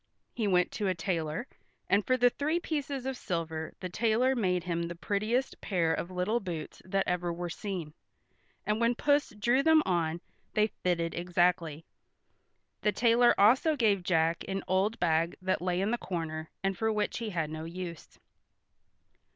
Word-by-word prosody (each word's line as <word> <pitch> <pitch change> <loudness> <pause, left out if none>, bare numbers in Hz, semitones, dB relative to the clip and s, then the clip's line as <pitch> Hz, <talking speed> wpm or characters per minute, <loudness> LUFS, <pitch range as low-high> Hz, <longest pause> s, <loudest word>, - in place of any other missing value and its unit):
He 220 -3 -1
went 180 -2 +3
to 205 -2 -2
a 185 - +1
tailor, 165 +2 -2 0.4
and 205 +1 +3
for 255 +4 +2
the 245 0 +5
three 310 +6 0
pieces 285 -5 -3
of 265 0 -2
silver 165 -6 -3
the 185 - -3
tailor 230 +7 +2
made 180 -6 +1
him 170 -1 -1
the 170 - -6
prettiest 215 - -1
pair 170 -5 +1
of 175 - -3
little 185 +6 0
boots 170 -7 -6
that 195 +1 0
ever 175 -1 0
were 175 0 -4
seen, 180 -8 -5 0.7
and 210 +2 0
when 235 +1 +3
Puss 290 +3 +2
drew 240 +6 +3
them 315 +1 +5
on 170 -2 0 0.4
they 215 - +4 0.2
fitted 170 -2 0
exactly. 175 -3 0 1.0
The 210 - +2
tailor 240 +2 +4
also 255 +10 +5
gave 215 -7 +2
Jack 165 -2 +1
an 195 0 -3
old 195 +5 +1
bag 165 0 +1
that 185 -1 -1
lay 180 0 0
in 200 +3 0
the 240 - 0
corner, 160 -3 -4
and 195 0 0
for 220 +4 0
which 210 0 -1
he 230 -2 -3
had 165 -5 -2
no 160 0 -5
use. 170 -1 -7
185 Hz, 170 wpm, -30 LUFS, 170-230 Hz, 1.0 s, the